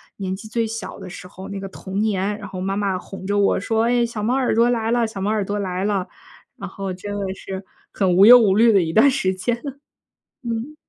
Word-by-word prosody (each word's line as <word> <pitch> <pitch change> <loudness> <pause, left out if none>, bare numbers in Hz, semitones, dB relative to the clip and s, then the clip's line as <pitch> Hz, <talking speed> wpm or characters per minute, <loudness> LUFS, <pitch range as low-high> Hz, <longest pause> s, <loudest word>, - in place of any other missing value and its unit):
年 190 -2 -4
纪 205 +3 -8
最 230 +1 -1
小 220 -3 -6
的 190 -1 -9
时 180 - -10
候， 190 +1 -10
那 200 0 -5
个 195 - -6
童 190 0 -6
年。 205 -1 0
然 205 - -8
后 185 -1 -7
妈 195 +1 -2
妈 200 -2 0
哄 190 +1 -9
着 205 0 0
我 200 -1 +3
说：” 220 +3 0
哎， 240 0 +2
小 230 -3 -5
猫 235 +4 +1
耳 260 -4 +1
朵 235 +1 +4
来 230 -2 0
了， 240 -1 +2
小 220 -3 -6
猫 195 +2 -1
耳 215 -1 0
朵 205 +2 -3
来 185 -1 -3
了。 200 -3 -1 0.5
“然 - - -7
后 195 -1 -5
真 195 +3 -7
的 195 -2 -3
是 190 0 -7 0.3
很 185 -3 +1
无 195 +2 +7
忧 245 +3 +10
无 200 -5 +3
虑 230 +2 +5
的 200 -3 +4
一 165 -1 -2
段 270 +8 +6
时 190 -7 0
间 230 +6 -1
了。 280 -2 -6 0.6
嗯。 235 +4 -4
205 Hz, 270 characters per minute, -21 LUFS, 190-225 Hz, 0.6 s, 忧